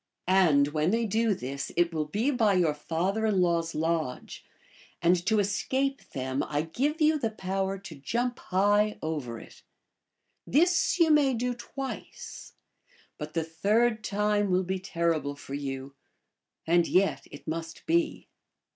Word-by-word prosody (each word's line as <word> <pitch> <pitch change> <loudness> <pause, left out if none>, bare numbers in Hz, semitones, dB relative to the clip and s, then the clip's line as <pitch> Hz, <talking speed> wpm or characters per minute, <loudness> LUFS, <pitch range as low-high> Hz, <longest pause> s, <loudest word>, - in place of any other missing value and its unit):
And 165 -7 +4
when 155 +2 0
they 230 +3 +1
do 220 0 +1
this 135 -1 -5
it 175 0 +2
will 155 -1 -1
be 220 - 0
by 220 -7 +3
your 170 -4 +3
father 180 +8 -1
in 205 -3 +2
law 170 -2 +3
s 165 0 -5
lodge, 160 -4 -2 0.6
and 175 +1 +3
to 220 0 +3
escape 265 +7 0
them 130 0 -2
I 150 0 -1
give 275 - -1
you, 310 0 +4
the 225 - 0
power 195 -1 -2
to 190 -4 -10
jump 240 - -2
high 205 +3 +2
over 140 -8 -3
it. - - -14 0.9
This 345 +6 +3
you 325 -2 +5
may 285 -4 +4
da 245 +2 -1
twice, 265 +3 -7 0.7
but 150 +1 -7
the 165 - +1
third 215 +8 +1
time 210 -1 +1
will 185 0 +2
be 190 +1 -2
terrible 170 -6 -1
for 140 -1 -10
you, 135 -1 -5 0.7
and 170 0 +3
yet 190 +1 +1
it 145 - -12
must 165 +1 -5
be." 335 0 0
185 Hz, 155 wpm, -28 LUFS, 160-225 Hz, 0.9 s, you